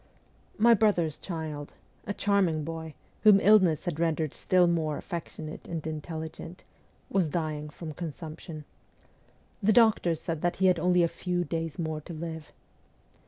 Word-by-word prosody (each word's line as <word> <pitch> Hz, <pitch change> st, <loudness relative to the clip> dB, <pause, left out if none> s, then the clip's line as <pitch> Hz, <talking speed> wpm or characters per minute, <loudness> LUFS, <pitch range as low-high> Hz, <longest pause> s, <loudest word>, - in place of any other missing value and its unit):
My 235 Hz, +2 st, +6 dB
brother's 185 Hz, -8 st, +2 dB
child 155 Hz, -4 st, -6 dB, 0.3 s
a 205 Hz, -, -1 dB
charming 190 Hz, -6 st, +2 dB
boy, 160 Hz, 0 st, -6 dB, 0.3 s
whom 210 Hz, -2 st, +7 dB
illness 195 Hz, -6 st, +5 dB
had 170 Hz, -3 st, -3 dB
rendered 160 Hz, -3 st, 0 dB
still 180 Hz, -1 st, +3 dB
more 160 Hz, -3 st, 0 dB
affectionate 160 Hz, -3 st, -7 dB
and 165 Hz, -3 st, -5 dB
intelligent 160 Hz, +2 st, -6 dB, 0.5 s
was 185 Hz, -5 st, +2 dB
dying 155 Hz, -2 st, -3 dB
from 155 Hz, +1 st, -8 dB
consumption. 160 Hz, -1 st, -7 dB, 1.0 s
The 215 Hz, +2 st, +4 dB
doctors 210 Hz, -8 st, +4 dB
said 165 Hz, -2 st, -4 dB
he 190 Hz, -, +1 dB
had 180 Hz, -2 st, +4 dB
only 180 Hz, +1 st, +3 dB
a -, -, +4 dB
few 175 Hz, +1 st, -2 dB
days 165 Hz, -2 st, -3 dB
more 160 Hz, -3 st, -3 dB
to 170 Hz, -, -9 dB
live. 160 Hz, -1 st, -6 dB
165 Hz, 140 wpm, -28 LUFS, 155-180 Hz, 1.0 s, whom